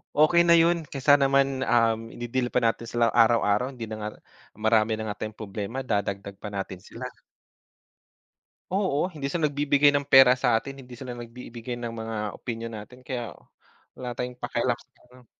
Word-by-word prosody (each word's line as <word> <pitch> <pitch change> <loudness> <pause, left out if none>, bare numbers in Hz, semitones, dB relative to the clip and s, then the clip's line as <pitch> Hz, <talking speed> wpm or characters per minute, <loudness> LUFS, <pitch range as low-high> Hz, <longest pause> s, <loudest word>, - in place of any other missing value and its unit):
Okey 155 +3 +5
na 170 -1 +6
yun 170 0 +3
kaysa 140 +1 +5
naman, 135 -1 +2
um, 115 -2 +2
i-de-deal 120 +1 -2
pa - - +3
na'tin 115 0 0
sila 115 0 +1
araw-araw 115 +1 +3
hindi 120 -4 -7
na 110 - -5
nga 105 - -2 0.5
marami 110 0 +2
na 110 - -4
nga 105 0 -5
tayong 110 0 -7
problema 105 +4 -5
dadagdag 100 -1 -2
pa 105 - -8
natin 95 -2 -5
sila. 125 +4 -7 1.6
Oo, 185 -4 0
hindi 150 -6 -7
sila 160 -1 +1
nagbibigay 145 0 +3
ng 140 0 0
pera 135 -2 +7
sa 120 -3 +3
atin 135 +3 -9
hindi 125 0 -13
sila 125 0 -7
nagbibigay 120 0 -8
ng 120 -1 -5
mga 110 0 -5 0.2
opinyon 115 -1 -5
na'tin 115 +4 -11
kaya 125 -3 -5 0.6
wala 125 -1 -5
tayong 125 +1 -5
pakialam 120 0 -1
sa 130 - -22 0.2
ano. 125 0 -18
120 Hz, 170 wpm, -26 LUFS, 115-135 Hz, 1.6 s, pera